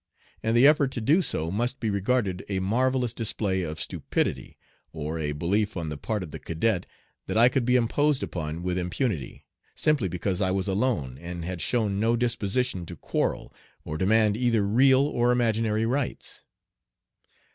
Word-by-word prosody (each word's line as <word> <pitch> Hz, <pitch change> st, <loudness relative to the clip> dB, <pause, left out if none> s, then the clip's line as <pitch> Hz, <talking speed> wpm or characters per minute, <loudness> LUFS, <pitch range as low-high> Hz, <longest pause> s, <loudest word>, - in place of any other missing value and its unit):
And 115 Hz, +1 st, +1 dB
the 125 Hz, -, +6 dB
effort 145 Hz, -2 st, +5 dB
to -, -, -2 dB
do 150 Hz, -, +3 dB
so 80 Hz, -, -2 dB
must 120 Hz, +6 st, -1 dB
be 110 Hz, -3 st, -1 dB
regarded 100 Hz, -2 st, 0 dB
a 95 Hz, -2 st, -1 dB
marvellous 125 Hz, +4 st, +1 dB
display 105 Hz, -4 st, -1 dB
of 80 Hz, -2 st, -5 dB
stupidity, -, -, -2 dB, 0.3 s
or 80 Hz, +1 st, -4 dB
a 75 Hz, -2 st, -1 dB
belief 100 Hz, +8 st, -1 dB
on 80 Hz, -3 st, -3 dB
the 75 Hz, -, -4 dB
part 105 Hz, +8 st, -3 dB
of 80 Hz, -, -8 dB
the -, -, -7 dB
cadet 90 Hz, +3 st, -1 dB, 0.4 s
that -, -, -1 dB
I 120 Hz, +2 st, +7 dB
could 130 Hz, -2 st, 0 dB
be 125 Hz, +1 st, +3 dB
imposed 135 Hz, +4 st, +2 dB
upon 80 Hz, 0 st, -4 dB
with 90 Hz, 0 st, -1 dB
impunity, 90 Hz, -, -3 dB, 0.3 s
simply 150 Hz, -10 st, +2 dB
because 90 Hz, +2 st, -2 dB
I 95 Hz, -, +2 dB
was 95 Hz, +1 st, -1 dB
alone 95 Hz, -, -1 dB
and 85 Hz, 0 st, -6 dB
had 90 Hz, -1 st, -4 dB
shown 105 Hz, -5 st, 0 dB
no 115 Hz, +2 st, +2 dB
disposition 120 Hz, -3 st, -1 dB
to 85 Hz, -, -7 dB
quarrel -, -, -2 dB, 0.3 s
or 75 Hz, -, -4 dB
demand 105 Hz, +4 st, +3 dB
either 115 Hz, -3 st, +1 dB
real 130 Hz, +6 st, +5 dB
or 125 Hz, -4 st, +2 dB
imaginary 115 Hz, -2 st, +1 dB
rights. 130 Hz, +2 st, -3 dB
105 Hz, 170 wpm, -26 LUFS, 90-120 Hz, 0.4 s, I